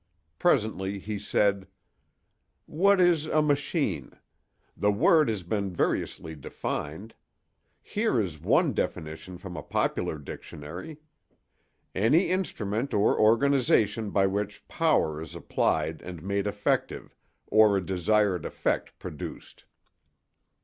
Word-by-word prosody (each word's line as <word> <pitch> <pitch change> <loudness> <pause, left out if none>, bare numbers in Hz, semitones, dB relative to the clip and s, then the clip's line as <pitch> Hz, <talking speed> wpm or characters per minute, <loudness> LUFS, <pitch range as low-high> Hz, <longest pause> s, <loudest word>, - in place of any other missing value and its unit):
Presently 105 - +1
he 105 +1 -5
said: 100 -1 +1 1.0
"What 195 +5 +3
is 170 -4 +3
a 155 - +2
'machine'? 145 - -1 0.6
The 105 - +2
word 150 +7 +4
has 105 -5 -2
been 100 +2 -2
variously 85 -2 -2
defined. 80 - -5 0.7
Here 210 - 0
is 90 -8 -3
one - - +3
definition 80 +4 -4
from 90 0 -9
a - - -5
popular 80 - -1
dictionary: 80 - -9 1.0
'Any 120 - +3
instrument 120 - -2
or 105 0 +3
organization 115 -2 +3
by 100 -1 +2
which 100 +1 -3
power 80 - +1
is 80 - -8
applied 80 0 -1
and 90 -3 -8
made 100 +1 -1
effective, 100 0 -2 0.3
or 110 -2 +5
a 95 - -3
desired 95 0 +1
effect - - -2
produced. - - -9
105 Hz, 110 wpm, -27 LUFS, 90-130 Hz, 1.0 s, or